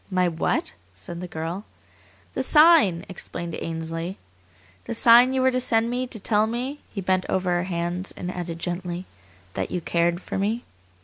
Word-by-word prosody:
"My 185 -2 +2
what?" 165 -1 -1 0.2
said 170 - -7
the 180 - -5
girl. 165 +4 -4 0.7
"The - - -1
sign!" 300 - +6
explained 170 -2 -5
Ainsley. 165 +3 -4 0.7
"The 235 - -4
sign 240 +3 +7
you 260 -1 +1
were 260 - +4
to 255 - +1
send 230 -1 +1
me 250 +1 -1
to 235 -3 -5
tell 210 +1 +2
me" 255 +5 -3
he 195 - -4
bent 185 0 +1
over 185 -1 0
her 175 0 +1
hands 175 +1 -3
and 180 0 -4
added 175 -2 -5
gently 175 +1 -4 0.5
"that 95 - -2
you 180 - -2
cared 170 +1 +1
for 195 - -4
me." 220 +4 -1
185 Hz, 175 wpm, -24 LUFS, 170-230 Hz, 0.7 s, sign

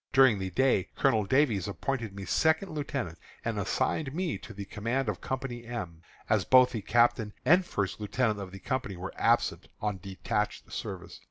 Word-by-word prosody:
During 130 -6 +6
the 95 -1 -2
day 115 -2 +2
Colonel 110 -7 +3
Davies 115 - +2
appointed 115 0 -3
me 100 -1 -6
second 160 - +2
lieutenant, 140 - -3 0.3
and 115 -2 -1
assigned 130 +8 -1
me 170 - -1
to - - -10
the 100 0 -7
command 115 +6 -2
of 105 -4 -2
Company 130 -2 -4
M, 95 -9 -6 0.3
as - - +3
both 130 -1 +6
the 110 - -3
captain 110 0 +2
and 175 +7 +6
first 100 - -2
lieutenant 110 0 0
of 95 -2 -6
the 95 - -8
company 130 -2 -3
are 90 +2 -6
absent - - +2
on 105 -2 -2
detached 95 0 -3
service. - - -6
115 Hz, 175 wpm, -29 LUFS, 100-130 Hz, 0.3 s, During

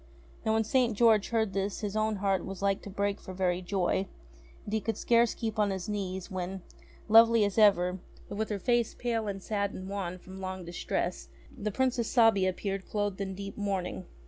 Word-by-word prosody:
Now 220 -1 +1
when 220 0 +3
St. 235 -1 +1
George 220 -3 +4
heard 220 -4 0
this 195 +1 -2
his 205 -1 -3
own 215 0 +1
heart 195 -2 0
was 195 0 -6
like 195 -1 +1
to - - -9
break 200 +1 -1
for 185 - -8
very 180 -1 0
joy, 190 +1 0 0.6
and 205 - -7
he 220 - +1
could 225 -1 -2
scarce 235 -1 +3
keep 220 -1 -3
on 210 -1 +3
his 190 0 -3
knees 190 -3 -4
when, 185 0 -4 0.4
lovely 225 0 +7
as 200 +2 -1
ever, 185 -3 +4 0.3
but 205 - -6
with 220 +1 -2
her 210 - -1
face 240 +3 +1
pale 230 -3 -1
and 195 -2 -4
sad 200 -2 -1
and 185 - -7
wan 190 -3 -4
from 190 +1 -11
long 185 -1 -5
distress, 170 +1 -3 0.3
the 210 -4 -3
Princess 245 +1 0
Sabia 225 -6 +5
appeared 195 +1 -4
clothed 205 -2 -2
in 190 -1 -3
deep 200 +1 -7
mourning. 190 -2 -2
200 Hz, 200 wpm, -30 LUFS, 190-220 Hz, 0.6 s, lovely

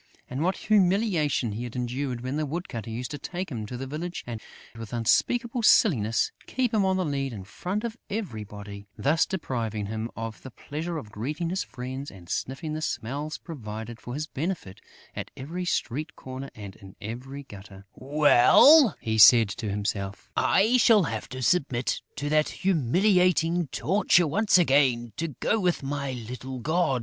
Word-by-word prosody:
And 130 +3 -4
what 185 +2 +1
humiliation 185 - +2
he 115 +4 -4
endured 125 +1 -3
when 130 +3 -3
the 155 0 0
woodcutter 135 - -5
used 120 +4 -5
to 145 - -5
take 180 +3 -5
him 110 -4 -4
to 125 - -6
the 135 - -5
village 165 +6 -5
and, 115 -2 -6 0.3
with 115 -1 -8
unspeakable 235 - +1
silliness, 115 - +4 0.2
keep 250 -3 -1
him 210 -2 +3
on 190 0 +2
the 185 - 0
lead 135 -3 -2
in 100 -4 -7
front 185 - -4
of 235 -1 -4
everybody, 105 - -6
thus 155 +4 +2
depriving 115 - -3
him 110 +2 -4
of 115 -1 -6
the 130 - -9
pleasure 160 +7 -5
of 110 -9 -8
greeting 150 +11 -3
his 190 - -1
friends 130 +2 -6
and 90 -3 -14
sniffing 150 +4 -3
the 155 - -3
smells 145 +1 -3
provided 110 -6 -8
for 120 - -6
his 155 +1 -2
benefit 155 - -5 0.3
at - - -5
every 170 +7 -5
street 155 0 -2
corner 130 +1 -7
and 100 -3 -9
in 95 -1 -14
every 125 +6 -7
gutter: 100 -4 -12
"Well," 155 - +6
he 110 -1 -1
said 115 0 +8
to 100 +2 -4
himself, 100 -1 -3
"I 220 +6 +4
shall 225 -4 +6
have 110 -6 -4
to 130 0 -5
submit 130 -6 +1
to 145 - -3
that 155 0 +3
humiliating 180 - +2
torture 180 +4 +2
once 205 +7 +3
again, 130 -8 +3
to 165 - -1
go 165 - -1
with 180 -6 0
my 140 -1 -3
little 125 +2 -6
god!" 155 +1 +1
135 Hz, 170 wpm, -26 LUFS, 115-175 Hz, 0.3 s, said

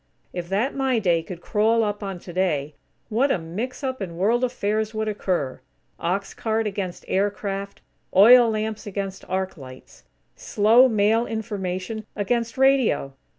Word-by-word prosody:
If 175 -1 -5
that 215 +8 0
"My 265 -3 +1
Day" 175 -6 +2
could 175 +1 -9
crawl 225 +4 +2
up 205 0 -2
on 195 -2 -4
"Today," 170 -5 -2 0.4
what 245 +6 +2
a - - +2
mix 210 - -5
up 260 -3 -3
in 170 -3 -5
World 225 +7 +2
affairs 220 -3 -1
would 220 0 -1
occur! 185 -10 -2 0.4
Ox 190 +4 -2
cart 225 0 -1
against 195 -3 -4
aircraft; 200 0 -2 0.3
oil 235 +5 +8
lamps 215 -1 -3
against 195 -1 -5
arc 190 0 -2
lights! 130 -2 -13 0.3
Slow, 225 +5 +4
mail 220 +1 +2
information 210 -1 -4
against 230 +4 -1
radio! 265 - +3
205 Hz, 145 wpm, -24 LUFS, 185-225 Hz, 0.4 s, oil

